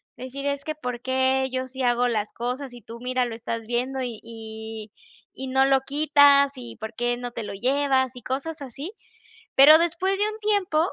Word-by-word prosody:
decir: 260 +2 -7
"Es 280 0 -2
que 310 - -4
¿por 250 -5 -5
qué 260 +1 +1
yo 255 0 -2
sí 260 +1 -5
hago 245 0 +2
las 215 -3 -1
cosas?, 250 +2 -4
y 240 - -12
tú 230 +2 -10
mira, 255 0 0
lo 235 -2 -5
estás 230 0 -5
viendo 255 +3 -1
y 240 -4 -4
y 220 -1 -8 0.4
y 265 - -6
no 265 +1 +3
lo 270 -1 +3
quitas. 285 0 +5
¿Y 245 -2 -9
por 220 +1 -7
qué 240 +1 0
no 245 0 -5
te 230 - -5
lo 210 - -6
llevas?". 260 +3 +1
Y 245 - -9
cosas 280 +6 -4
así. 275 - -7 0.7
Pero 295 +4 +9
después 345 +3 0
de 410 - +3
un 430 0 -6
tiempo 405 -6 +1
260 Hz, 205 wpm, -24 LUFS, 240-280 Hz, 0.7 s, Pero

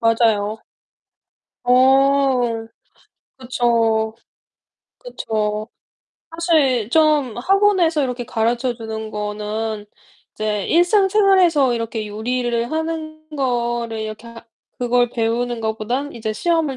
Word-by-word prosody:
맞아요. 225 -2 +2 1.1
어 260 -1 +3 0.8
그쵸. 230 -3 +1 0.8
그쵸. 215 - -3 0.6
사실 305 - +1
좀 300 -6 +3
학원에서 365 +1 +2
이렇게 250 -2 -3
가르쳐 235 +3 -1
주는 220 -1 -6
거는 210 +1 -4 0.5
이제 210 -2 -2
일상생활에서 370 - +4
이렇게 230 -2 -3
요리를 235 +2 -2
하는 315 -1 -4
거를 240 -3 -1
이렇게 215 +1 -6
하 230 0 -12 0.3
그걸 245 0 +2
배우는 235 0 -1
것보단 225 +6 -2
이제 220 -2 -4
시험을 320 +2 0
240 Hz, 215 characters per minute, -20 LUFS, 220-290 Hz, 1.1 s, 일상생활에서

